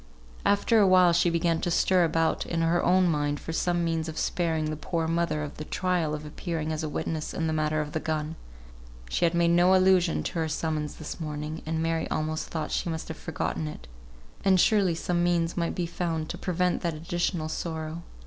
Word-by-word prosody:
After 205 +3 +3
a 200 - +5
while 185 -2 +6
she 175 +1 +3
began 165 -1 +1
to - - -1
stir 180 +1 +3
about 165 0 +1
in 165 -1 0
her 170 +1 +2
own 185 0 +4
mind 145 -3 0
for 165 - -6
some 175 +1 +1
means 165 -1 -1
of 155 - -7
sparing 165 -3 0
the - - -2
poor 165 +1 -2
mother 155 -3 -1
the 155 - -5
trial 175 -2 0
of 150 0 -7
appearing 160 0 -4
as 155 - -3
a 155 - -3
witness 155 +1 -3
in 165 - -1
the 160 - 0
matter 155 0 +1
of 150 0 -5
the 160 - -1
gun. 155 0 -2 0.8
She - - +2
had 170 0 +1
made 170 0 +3
no 175 +2 +5
allusion 185 -2 +3
to 175 - -3
her 160 - 0
summons 155 -1 -2
this 155 - -7
morning, 150 0 -4
and 160 0 -1
Mary 165 0 -1
almost 155 0 -2
thought 155 -2 -4
she - - -1
must 160 -1 -4
have 160 - -5
forgotten 160 0 -3
it; 150 - -9 0.6
and 190 -1 +4
surely 195 -4 +3
some 175 +1 0
means 170 -1 +1
might 170 -1 -1
be 175 - -1
found 165 -2 -3
to - - -4
prevent 180 0 0
that 170 -3 -1
additional 170 +1 -2
sorrow. 160 0 -4
165 Hz, 210 wpm, -27 LUFS, 155-175 Hz, 0.8 s, while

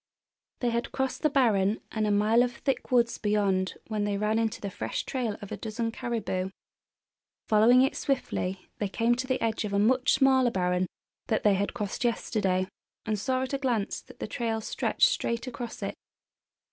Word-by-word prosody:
They 245 -2 +1
had 235 +1 -2
crossed 265 -1 -2
the 305 - +3
barren 220 -7 +3
and 215 -1 0
a - - +2
mile 210 +3 +4
of 245 0 +1
thick 270 +2 -2
woods 240 -2 +3
beyond 200 -3 +1
when 215 -2 -2
they 205 -1 0
ran 210 +2 +1
into 225 0 -1
the 200 - -5
fresh 110 -9 -3
trail 240 -6 -2
of 200 - -9
a - - -3
dozen 225 +1 -3
caribou. 220 -6 -2 1.0
Following 230 +4 +6
it 270 - +1
swiftly 195 -8 -2
they 205 - 0
came 230 +4 +2
to 255 +2 -2
the 260 - 0
edge 225 -1 0
of 205 -1 -3
a - - +2
much 255 +6 +3
smaller 265 -2 +4
barren 180 -2 0 0.4
that 220 - 0
they 210 - +5
had 200 +4 -1
crossed 210 -2 -3
yesterday, 195 -5 0 0.4
and 215 -1 -1
saw 255 +5 0
at 260 - -4
a 275 - 0
glance 240 -7 -1
that - - -16
the - - -4
trail 225 0 -2
stretched 220 - +2
straight 235 - -1
across 245 -2 -6
it. - - -2
225 Hz, 190 wpm, -28 LUFS, 205-250 Hz, 1.0 s, Following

